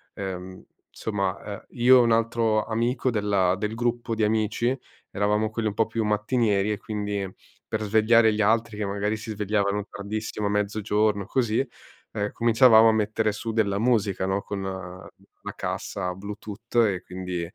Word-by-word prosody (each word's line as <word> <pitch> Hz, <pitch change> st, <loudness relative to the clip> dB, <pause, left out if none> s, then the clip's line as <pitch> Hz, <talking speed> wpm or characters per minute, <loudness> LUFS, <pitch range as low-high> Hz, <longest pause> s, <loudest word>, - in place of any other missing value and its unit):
ehm, 95 Hz, -1 st, -6 dB, 0.3 s
somma, 100 Hz, -3 st, -3 dB
ehm, 100 Hz, -1 st, -7 dB
io 125 Hz, +2 st, +6 dB
e -, -, +6 dB
un 115 Hz, -1 st, +2 dB
altro 115 Hz, -1 st, +2 dB
amico 120 Hz, +3 st, 0 dB
della 100 Hz, -4 st, +1 dB
del 105 Hz, +2 st, -3 dB
gruppo 120 Hz, 0 st, -1 dB
di 110 Hz, -, 0 dB
amici 110 Hz, +3 st, +1 dB, 0.4 s
eravamo 105 Hz, +2 st, +1 dB
quelli 110 Hz, 0 st, -2 dB
un 100 Hz, -, -6 dB
po' 115 Hz, -, +3 dB
più 115 Hz, 0 st, -2 dB
mattinieri 105 Hz, -1 st, +1 dB
e 105 Hz, -, -1 dB
quindi 105 Hz, -2 st, -3 dB, 0.4 s
per 110 Hz, -, -2 dB
svegliare 110 Hz, +2 st, +4 dB
gli 105 Hz, -, 0 dB
altri, 110 Hz, 0 st, +1 dB
che 105 Hz, -, -2 dB
magari 100 Hz, +2 st, -1 dB
si 110 Hz, +1 st, -7 dB
svegliavano 105 Hz, -1 st, 0 dB
tardissimo, 105 Hz, 0 st, -4 dB
mezzogiorno, 105 Hz, 0 st, 0 dB
così, 120 Hz, +3 st, 0 dB, 0.5 s
ehm, 105 Hz, -1 st, -2 dB
cominciavamo 115 Hz, -1 st, +6 dB
a -, -, +3 dB
mettere 110 Hz, 0 st, +1 dB
su 115 Hz, +2 st, -4 dB
della 100 Hz, -3 st, +1 dB
musica, 105 Hz, -5 st, +1 dB
no, 95 Hz, +1 st, 0 dB
con 100 Hz, -1 st, -5 dB
la 95 Hz, -1 st, -9 dB
cassa 90 Hz, 0 st, -3 dB
Bluetooth 105 Hz, +4 st, -9 dB
e 100 Hz, -6 st, +3 dB
quindi, 90 Hz, -1 st, -5 dB
105 Hz, 155 wpm, -25 LUFS, 100-115 Hz, 0.5 s, io